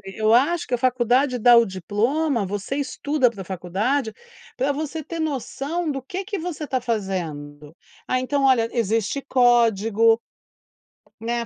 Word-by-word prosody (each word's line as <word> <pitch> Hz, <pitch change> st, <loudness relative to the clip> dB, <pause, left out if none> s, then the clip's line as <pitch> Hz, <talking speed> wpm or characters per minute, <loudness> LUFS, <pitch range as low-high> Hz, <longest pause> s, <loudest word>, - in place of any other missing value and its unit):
eu 215 Hz, 0 st, +2 dB
acho 325 Hz, +8 st, +2 dB
que 250 Hz, -, -5 dB
a -, -, +3 dB
faculdade 250 Hz, +1 st, +1 dB
dá 240 Hz, +1 st, +7 dB
o 235 Hz, -, +5 dB
diploma, 225 Hz, -, -1 dB
você 205 Hz, +6 st, -4 dB
estuda 285 Hz, -1 st, 0 dB
pra 200 Hz, -4 st, -8 dB
faculdade, 200 Hz, +8 st, -2 dB, 0.4 s
pra 270 Hz, +3 st, +1 dB
você 310 Hz, +2 st, -4 dB
ter 330 Hz, +3 st, -6 dB
noção 310 Hz, +2 st, -3 dB
do 270 Hz, -1 st, -4 dB
que 360 Hz, -, -7 dB
é 390 Hz, -, -5 dB
que 410 Hz, 0 st, -4 dB
você 320 Hz, -3 st, -5 dB
tá 260 Hz, -1 st, -1 dB
fazendo. 160 Hz, -10 st, -4 dB, 0.3 s
Ah 255 Hz, -, +1 dB
então 275 Hz, +2 st, -1 dB
olha 255 Hz, -4 st, +4 dB
existe 225 Hz, +3 st, 0 dB
código, 230 Hz, -3 st, +3 dB, 1.0 s
né. 235 Hz, +1 st, -2 dB
245 Hz, 150 wpm, -23 LUFS, 215-280 Hz, 1.0 s, dá